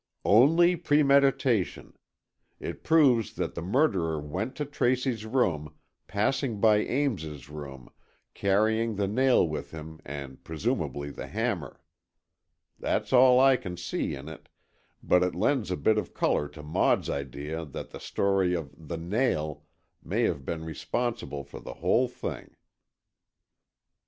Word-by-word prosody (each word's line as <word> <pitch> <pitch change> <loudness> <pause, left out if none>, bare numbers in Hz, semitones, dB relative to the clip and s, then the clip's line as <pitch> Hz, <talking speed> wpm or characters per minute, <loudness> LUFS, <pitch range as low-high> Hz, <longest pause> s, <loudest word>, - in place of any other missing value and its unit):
"Only 165 - +5
premeditation. 140 - +2 0.6
It - - -6
proves 140 -8 +4
that - - -3
the 85 - -5
murderer 90 - +1
went 75 - -4
to 150 - -3
Tracy's 125 -4 0
room, 90 - 0 0.3
passing 115 +2 0
by 110 0 +5
Ames's 100 - -2
room, 70 -4 -9 0.5
carrying 110 +3 +1
the 100 0 0
nail 125 -2 +3
with 75 -1 -5
him, 80 0 -9
and 70 -2 -8
presumably 70 -2 -2
the - - -7
hammer. 105 - -3 1.0
That's - - -1
all 125 0 +7
I 135 -1 +6
can 90 -8 -7
see - - -3
in 70 +2 -9
it, 80 -2 -11 0.5
but 90 - +4
it 90 0 0
lends 130 -9 +1
a 90 - -1
bit 110 -1 +3
of - - -7
colour 75 - +1
to 75 0 -11
Maud's 75 - +1
idea 70 +4 -4
that 75 - -8
the - - -8
story 95 -2 +1
of 75 -4 -5
The 80 +2 -7
Nail 85 - -1 0.4
may - - 0
have 70 - 0
been 80 +3 -4
responsible 95 - -3
for 70 - -10
the - - -9
whole 95 - +2
thing." 125 - -7
100 Hz, 135 wpm, -28 LUFS, 75-125 Hz, 1.0 s, all